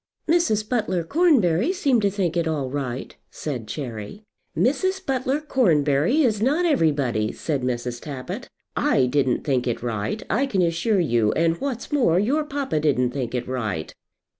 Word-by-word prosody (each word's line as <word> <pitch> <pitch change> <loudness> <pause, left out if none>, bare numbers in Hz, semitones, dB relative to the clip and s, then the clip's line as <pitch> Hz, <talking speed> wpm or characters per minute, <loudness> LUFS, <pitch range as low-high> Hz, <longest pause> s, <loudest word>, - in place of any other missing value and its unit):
"Mrs. 310 -11 +2
Butler 210 -8 0
Cornbury 245 - +3
seemed 280 - +2
to 200 - +3
think 185 -4 -1
it 170 -1 +1
all 145 -5 -2
right," 130 -3 -4
said 125 -8 -5
Cherry. 120 - -6 0.3
"Mrs. 375 - +1
Butler 265 +1 0
Cornbury 175 - +2
is 215 -5 +1
not 295 +9 +2
everybody," 145 - +1
said 145 -4 -3
Mrs. 120 -1 -3
Tappitt. 135 -4 -6 0.3
"I 130 - +3
didn't 130 -1 +1
think 130 -3 0
it 120 -1 -2
right, 110 -3 -2
I 245 - +1
can 195 -8 +1
assure 175 +5 +1
you; 120 -10 +2
and 165 +3 +1
what's 270 -2 -4
more, 245 - +3
your 275 +10 +1
papa 280 - -2
didn't 130 -5 +1
think 125 -2 -3
it 125 -1 -3
right." 110 -11 -3
165 Hz, 160 wpm, -23 LUFS, -, 0.3 s, Cornbury